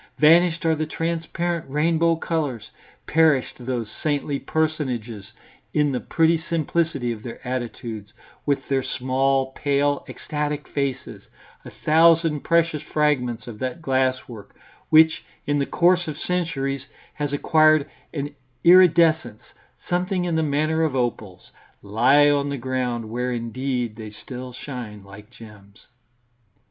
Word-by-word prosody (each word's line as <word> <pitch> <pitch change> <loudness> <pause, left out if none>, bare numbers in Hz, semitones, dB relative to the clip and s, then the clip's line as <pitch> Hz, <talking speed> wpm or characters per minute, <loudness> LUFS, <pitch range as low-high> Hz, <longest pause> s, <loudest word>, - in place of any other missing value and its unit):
Vanished 165 +2 +4
are 160 - +4
the 155 0 -2
transparent 170 0 -3
rainbow 165 +3 +2
colours, 145 -9 -3 0.3
perished 155 -4 +2
those 120 -2 -3
saintly 145 -2 -1
personages, 130 -9 -3 0.4
in 150 -1 +3
the 125 - -1
pretty 165 0 +2
simplicity 160 -5 -1
of 110 -2 -6
their 115 0 -8
attitudes, 115 -4 -5 0.3
with 140 -2 -1
their 135 -1 +1
small, 130 +1 0
pale, 145 0 0
ecstatic 150 -1 -4
faces; 140 -2 -3 0.4
a - - -9
thousand 165 0 +3
precious 170 -1 +1
fragments 145 -6 0
of 115 -3 -9
that 130 +6 -3
glasswork, 130 -7 -2 0.3
which 160 0 +5 0.2
in 145 0 0
the 140 - -1
course 175 0 +2
of 150 -2 -5
centuries 140 -7 -2 0.3
has 145 -1 -3
acquired 155 0 +3 0.2
an 145 -1 -4 0.3
iridescence 165 - +5 0.4
something 180 +1 0
in 175 - -1
the 160 - +2
manner 155 +2 0
of 155 -4 0
opals, 110 -7 -3 0.3
lie 125 +8 +4
on 145 -1 +2
the 140 - -3
ground, 125 -2 -2
where 125 +2 -2
indeed 120 0 -3
they 110 -2 -7
still 125 +4 -9
shine 120 -5 -8
like 100 +2 -13
gems. 105 -2 -16
140 Hz, 130 wpm, -23 LUFS, 125-160 Hz, 0.4 s, which